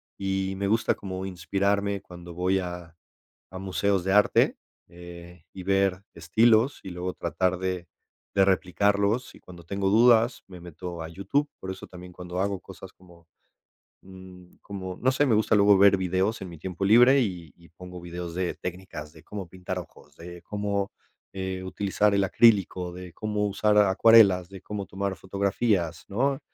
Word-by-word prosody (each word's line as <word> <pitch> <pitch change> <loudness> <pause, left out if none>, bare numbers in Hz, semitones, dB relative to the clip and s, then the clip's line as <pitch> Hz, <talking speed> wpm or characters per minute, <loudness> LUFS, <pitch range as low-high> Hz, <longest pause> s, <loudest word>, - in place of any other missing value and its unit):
Y 95 0 -2
me 100 0 -1
gusta 110 +2 +2
como 95 -1 -6
inspirarme 100 +2 -1
cuando 85 -1 -11
voy 95 +2 +1
a 90 -2 -7 0.5
a 95 - -9
museos 95 0 0
de 95 - -1
arte, 105 0 +3 0.3
eh, 85 -1 -12
y 95 - -8
ver 95 0 +1
estilos, 115 +4 +2
y 95 - -7
luego 90 +1 -4
tratar 90 -1 -1
de 90 -1 -3 0.5
de 95 - +5
replicarlos, 100 +4 +1
y - - -16
cuando 90 -2 -14
tengo 100 +3 -2
dudas, 115 +2 +4
me 90 -2 -12
meto 85 0 -8
a 80 - -5
YouTube. 100 - -1
Por 95 - -6
eso 95 - -9
también, 90 0 -12
cuando 90 0 -6
hago 100 0 -1
cosas 95 0 -12
como 85 -2 -20 0.8
mm, 95 -1 -14
como, 95 -2 -7
no 130 +2 +2
sé, 145 +3 +2
me 115 -6 +3
gusta 110 0 +2
luego 100 -1 +6
ver 100 0 +6
videos 95 +4 -1
en 95 - -6
mi 85 - -10
tiempo 95 +3 -4
libre, 125 +6 +6
y 90 - -4
y 85 -1 -19
pongo 90 +1 -11
videos 85 0 -7
de 90 -1 -1
técnicas, 90 -4 -7
de 80 0 -16
cómo 100 -1 -7
pintar 90 0 -6
ojos, 75 -3 -14
de 85 +1 -10
cómo, 100 -1 -2 0.4
eh, 95 -1 -4
utilizar 100 +2 0
el 100 - +2
acrílico, 95 -4 +3
de 90 -1 -10
cómo 105 -1 -2
usar 105 +1 +1
acuarelas, 100 -2 +5
de 95 -1 -11
cómo 100 0 -5
tomar 100 0 -3
fotografías, 95 -1 -1
¿no? 135 +6 0
95 Hz, 170 wpm, -26 LUFS, 90-100 Hz, 0.8 s, luego